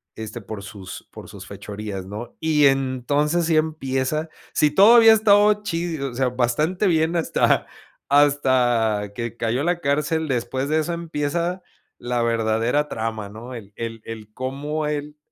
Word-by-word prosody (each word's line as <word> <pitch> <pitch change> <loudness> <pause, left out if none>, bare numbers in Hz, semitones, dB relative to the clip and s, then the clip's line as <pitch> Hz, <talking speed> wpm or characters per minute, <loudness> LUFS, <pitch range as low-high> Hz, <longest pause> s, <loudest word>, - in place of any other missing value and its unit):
este 110 +1 -7
por 100 0 -8
sus, 95 -2 -9
por - - -11
sus - - -10
fechorías, 105 -2 -7
¿no? 105 +5 -8
Y 150 -3 +4
entonces 135 +5 +1
así 160 -1 +2
empieza, 155 0 -1 0.2
si 150 -1 +3
todavía 225 +5 +7
ha - - +7
estado 210 -1 +4
chido, 165 -7 -3
o - - -12
sea, 130 0 0
bastante 150 - 0
bien 160 0 +2
hasta, 165 - +1 0.4
hasta 125 -7 +2
que 115 -1 -4
cayó 120 +3 -1
a - - -1
la 175 0 0
cárcel. 150 +3 0
Después 130 +2 -2
de 155 +1 +2
eso 170 +2 -2
empieza 170 +2 -2 0.4
la 120 0 -2
verdadera 115 +5 +1
trama, 110 -4 -4
¿no? 115 +4 -9
El-el 115 +1 -7
el 110 -2 -8
cómo 145 +4 -3
él, 150 0 -4
135 Hz, 155 wpm, -22 LUFS, 115-160 Hz, 0.4 s, todavía